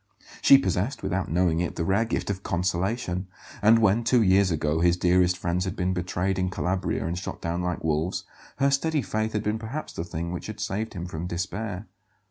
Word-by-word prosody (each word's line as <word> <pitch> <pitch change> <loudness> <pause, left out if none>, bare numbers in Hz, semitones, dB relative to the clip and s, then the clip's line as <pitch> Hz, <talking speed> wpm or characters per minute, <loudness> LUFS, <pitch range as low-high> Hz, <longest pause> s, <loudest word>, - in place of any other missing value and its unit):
She 135 - +8
possessed, 105 +3 -1
without 95 -1 -1
knowing 85 0 +2
it, 85 - -2
the 85 - -2
rare 100 +6 +2
gift 110 - -2
of 95 -1 -5
consolation; 90 +1 -1 0.3
and 110 +2 +6
when, 110 +1 +3
two 115 0 +4
years 95 0 +4
ago, 80 -1 0
his 85 +1 +3
dearest 90 0 +3
friends 85 +1 -1
had 95 -2 -3
been 90 +1 0
betrayed 90 +1 -1
in 90 0 +1
Calabria 90 -4 -1
and 85 +1 -2
shot 90 - -5
down 85 +1 -2
like 90 -1 -2
wolves, 80 +3 0 0.3
her 140 +1 +2
steady 150 +1 +1
faith 110 0 -2
had 105 0 -1
been 105 +1 -1
perhaps 120 +8 -5
the 80 - -4
thing 85 0 -4
which 90 - -5
had 110 -1 -7
saved 105 +1 -3
him 85 -1 -4
from 85 -1 -5
despair. 100 +3 -4
95 Hz, 205 wpm, -26 LUFS, 85-110 Hz, 0.3 s, She